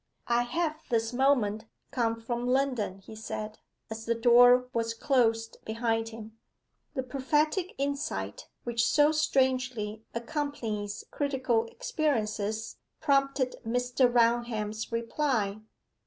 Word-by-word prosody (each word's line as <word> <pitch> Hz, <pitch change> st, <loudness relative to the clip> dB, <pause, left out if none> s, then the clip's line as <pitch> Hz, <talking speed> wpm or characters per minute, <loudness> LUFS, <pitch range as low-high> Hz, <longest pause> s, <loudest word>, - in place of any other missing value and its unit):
'I 235 Hz, 0 st, +2 dB
have 310 Hz, +4 st, -1 dB
this 225 Hz, -1 st, 0 dB
moment 245 Hz, -5 st, +2 dB, 0.3 s
come 230 Hz, -3 st, 0 dB
from 240 Hz, +1 st, -3 dB
London,' 250 Hz, -7 st, 0 dB
he 195 Hz, +3 st, -12 dB
said, 215 Hz, 0 st, -6 dB, 0.3 s
as 220 Hz, 0 st, -6 dB
the 235 Hz, -, +1 dB
door 245 Hz, +2 st, +6 dB
was 230 Hz, 0 st, -1 dB
closed 225 Hz, -3 st, +1 dB
behind 225 Hz, 0 st, -1 dB
him. 225 Hz, 0 st, -11 dB, 0.6 s
The 260 Hz, -, -1 dB
prophetic 295 Hz, +7 st, 0 dB
insight, 285 Hz, -, -3 dB, 0.2 s
which 235 Hz, -1 st, 0 dB
so 295 Hz, +4 st, +4 dB
strangely 255 Hz, -7 st, 0 dB
accompanies 235 Hz, -5 st, -3 dB
critical 260 Hz, -5 st, 0 dB
experiences, 225 Hz, -, -2 dB, 0.2 s
prompted 275 Hz, -2 st, +1 dB
Mr. 245 Hz, +2 st, +2 dB
Raunham's 230 Hz, -2 st, +1 dB
reply. 230 Hz, -3 st, 0 dB
240 Hz, 110 wpm, -29 LUFS, 225-270 Hz, 0.6 s, door